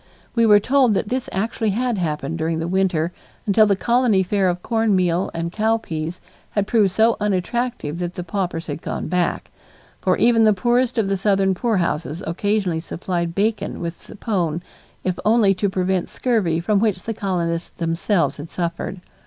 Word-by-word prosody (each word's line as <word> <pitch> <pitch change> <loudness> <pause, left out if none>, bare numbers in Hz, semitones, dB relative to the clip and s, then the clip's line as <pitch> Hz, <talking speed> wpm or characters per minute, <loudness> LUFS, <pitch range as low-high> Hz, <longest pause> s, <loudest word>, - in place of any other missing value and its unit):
We 230 -2 +3
were 210 -1 +8
told 250 0 +3
that 205 - -1
this 255 0 -2
actually 220 +3 -1
had 235 +1 0
happened 155 -1 -2
during 160 0 0
the 165 +1 -2
winter 180 -3 +1 0.3
until 215 +1 +5
the 200 - +3
colony 235 -2 +2
fare 190 0 +1
of 180 0 -3
corn 225 -3 +2
meal 180 0 +1
and 165 0 -3
cow 220 +3 +1
peas 165 -4 -5 0.3
had 205 -1 0
proved 210 -3 +3
so 220 +4 +3
unattractive 210 -3 -1
that 175 0 -3
the 180 - -4
paupers 175 -2 -3
had 145 +1 -5
gone - - -4
back, 180 -1 -1 0.5
for - - +1
even 230 -1 +4
the 215 -1 +5
poorest 240 +5 +1
of 220 -3 +2
the 195 0 0
southern 195 -1 +2
poorhouses 175 - -1
occasionally 190 0 0
supplied 170 0 -3
bacon 215 +2 -1
with 170 0 -6
the - - -11
pone 175 -7 -1 0.4
if 185 -1 -1
only 215 -2 +4
to 200 +2 0
prevent 185 -1 0
scurvy 205 -10 0
from 200 +4 +1
which 205 -4 0
the 225 - -3
colonists 175 -5 -2
themselves 170 +3 0
had 150 +3 -8
suffered. 175 +1 -4
190 Hz, 175 wpm, -21 LUFS, 170-220 Hz, 0.5 s, were